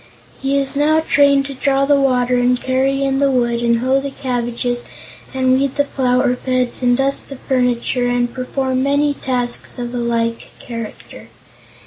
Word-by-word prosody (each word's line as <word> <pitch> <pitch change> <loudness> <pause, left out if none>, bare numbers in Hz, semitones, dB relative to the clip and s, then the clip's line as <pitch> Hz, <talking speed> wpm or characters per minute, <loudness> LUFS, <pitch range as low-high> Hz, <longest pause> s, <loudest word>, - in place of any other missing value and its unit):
He 270 +1 +1
is 275 0 -1
now 305 +2 +3
trained 280 -3 +3
to 275 - -6
draw 275 +1 +1
the 285 +1 +4
water 250 -2 +2
and 245 0 +2
carry 265 +2 0
in 270 0 0
the 280 0 +3
wood 240 -2 +1
and 235 -1 +2
hoe 265 +2 +2
the 280 - -4
cabbages 245 -2 -3 0.5
and 260 -1 +1
weed 275 -1 -1
the 285 - +2
flower 250 -2 +1
beds 250 -1 -2
and 245 -1 +3
dust 275 +1 -1
the 275 - -7
furniture 250 -1 0
and 245 -1 0
perform 260 0 -2
many 285 +2 +2
tasks 245 -3 -3
of 240 0 -5
a - - -3
like 230 -1 -1
character. 230 -3 -9
255 Hz, 170 wpm, -18 LUFS, 245-275 Hz, 0.5 s, the